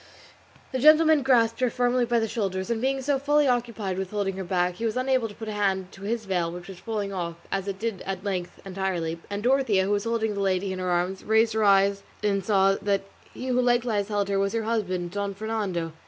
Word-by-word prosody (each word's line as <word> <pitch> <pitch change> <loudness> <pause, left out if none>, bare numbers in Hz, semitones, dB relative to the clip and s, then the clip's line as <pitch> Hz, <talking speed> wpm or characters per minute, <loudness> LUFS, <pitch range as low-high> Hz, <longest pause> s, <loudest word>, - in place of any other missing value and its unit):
The 260 - -2
gentleman 310 +2 +6
grasped 235 -4 +3
her 255 -1 +2
firmly 245 0 +1
by 240 0 +1
the 225 - 0
shoulders, 195 -2 -2
and 225 -1 -1
being 265 +1 0
so 280 0 +1
fully 290 +1 +3
occupied 230 -6 -1
with 190 -1 -3
holding 200 -2 -2
her 190 - -3
back, 180 0 0
he 230 - -3
was 225 +1 -1
unable 255 -2 +1
to 205 - -12
put 220 - -8
a - - -3
hand 195 -3 -1
to 195 - -14
his 220 +2 -2
veil 175 -3 0
which 175 0 -8
was 185 -2 -9
falling 210 -3 -3
off, 170 -3 -3 0.2
as 195 0 -2
it 195 -1 -3
did 220 -1 -3
at 190 -1 -4
length 185 -4 -3
entirely, 180 -4 -2
and 205 +1 -4
Dorothea, 245 -7 +3
who 195 - -1
was 205 +1 0
holding 225 -2 0
the 200 - -4
lady 190 0 0
in 185 - -5
her 185 0 -2
arms, 180 +2 -1
raising 220 0 +2
her 215 - +3
eyes 200 0 +4 0.4
saw 195 -1 +3
that 200 -1 +1 0.3
he 255 - -6
who 250 0 +2
likewise 240 -4 +1
held 205 -2 0
her 195 -1 +1
was 195 +1 0
her 230 -1 -1
husband, 185 -6 -1
Don 200 0 -3
Fernando. 200 -6 -2
205 Hz, 230 wpm, -26 LUFS, 190-230 Hz, 0.4 s, gentleman